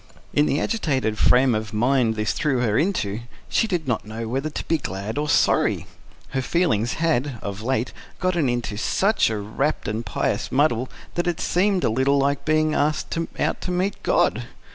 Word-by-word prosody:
In 150 0 +3
the 145 - +1
agitated 130 - -1
frame 125 0 +5
of 110 -1 -3
mind 120 0 +2
this 105 0 0
threw 140 -6 0
her 110 -4 +1
into, 115 - 0 0.3
she 225 - +2
did 175 -7 -2
not 120 -4 0
know 110 +2 -6
whether 135 +6 -2
to - - -5
be 165 -1 +1
glad 100 +3 -4
or 150 0 -2
sorry. - - +2 0.4
Her 135 - -1
feelings 125 - +1
had, 145 -5 0
of 100 0 -5
late, 125 0 -1 0.3
got 185 -1 0
into 120 -9 -1
such 195 - +2
a 110 - -2
rapt 110 +9 -2
and 110 +2 -2
pious 90 -8 -2
muddle 130 -3 +2 0.2
that 175 0 -1
it 175 -2 -1
seemed 190 +1 +1
a - - +3
little 130 +4 +2
like 140 0 0
being 155 0 +2
asked 150 +1 0 0.2
out - - -1
to - - -4
meet 185 +3 -1
God. - - +1
135 Hz, 185 wpm, -23 LUFS, 110-155 Hz, 0.4 s, frame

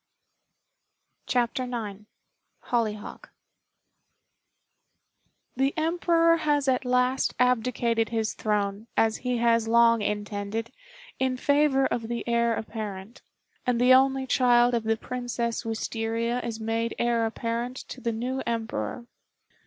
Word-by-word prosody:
] - - -50
CHAPTER 245 +2 +1
IX 220 -5 -5 0.7
HOLLYHOCK 215 -3 -2 2.3
The 270 +2 +1
Emperor 335 +1 +3
has 295 -3 +1
at 260 0 +1
last 250 +1 +1
abdicated 235 -2 +1
his 225 -1 -1
throne, 210 0 -2
as 220 -1 +3
he 250 -1 -2
has 230 -1 +2
long 230 0 +5
intended, 210 +2 -3 0.5
in 260 -1 0
favor 285 0 +3
of 230 -3 -2
the 235 +1 -4
Heir 235 -1 +2
apparent, 215 0 -6 0.5
and 245 -1 +2
the 250 +1 +6
only 265 0 +4
child 245 -1 +4
of 230 -2 0
the 225 0 +1
Princess 245 -1 -3
Wistaria 225 +1 -2
is 230 -2 -4
made 225 +1 -2
Heir 235 -1 +1
apparent 235 +2 -3
to 255 - -8
the 235 - -1
new 250 +4 -3
Emperor. 230 +1 -3
235 Hz, 120 wpm, -26 LUFS, 225-250 Hz, 2.3 s, the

